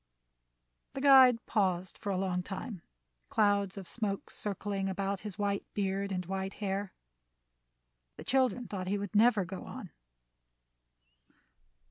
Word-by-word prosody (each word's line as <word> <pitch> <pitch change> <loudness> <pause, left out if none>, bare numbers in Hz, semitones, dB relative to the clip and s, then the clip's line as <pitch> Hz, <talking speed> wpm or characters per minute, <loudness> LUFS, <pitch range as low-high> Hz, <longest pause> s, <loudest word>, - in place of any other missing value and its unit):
The 270 - -4
guide 260 -4 +7
paused 185 -4 0
for 205 - -4
a 190 - 0
long 185 -1 0
time, 195 +1 -6 0.5
clouds 200 -2 +2
of 190 -3 -7
smoke 205 -4 -3
circling 200 -1 -3
about 195 +1 -2
his 210 -1 -7
white 200 -1 0
beard 195 0 -1
and 180 -1 -2
white 190 +1 -3
hair. 200 -1 -3 1.2
The - - -8
children 255 -2 +1
thought 185 -3 -4
he 200 +2 0
would 200 0 -5
never 215 -2 +5
go 185 +2 -7
on. - - -8
200 Hz, 130 wpm, -31 LUFS, 190-210 Hz, 1.2 s, guide